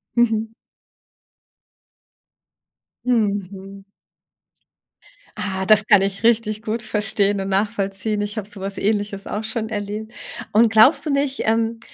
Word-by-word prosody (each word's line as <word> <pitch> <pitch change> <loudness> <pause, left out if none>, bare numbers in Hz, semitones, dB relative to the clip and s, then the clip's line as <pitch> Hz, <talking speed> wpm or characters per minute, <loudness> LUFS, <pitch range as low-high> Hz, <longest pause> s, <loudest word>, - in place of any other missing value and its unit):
Mhm. 225 -2 +2 2.6
Mhm. 200 -4 -2 1.5
Ah, 190 -3 -3
das 215 0 +5
kann 205 -3 +6
ich 195 +2 -2
richtig 220 -2 +2
gut 220 +1 -2
verstehen 205 -2 0
und 195 - -4
nachvollziehen. 205 +1 -1
Ich 205 +1 -4
habe 205 -1 -4
so 205 -2 -7
was 195 0 -4
Ähnliches 205 -1 -1
auch 210 +2 -3
schon 220 0 -3
erlebt. 210 +1 -5 0.4
Und 220 +1 +4
glaubst 225 +10 +5
du 300 - -1
nicht, 280 -1 0
ähm, 225 +1 0
210 Hz, 120 wpm, -21 LUFS, 200-225 Hz, 2.6 s, kann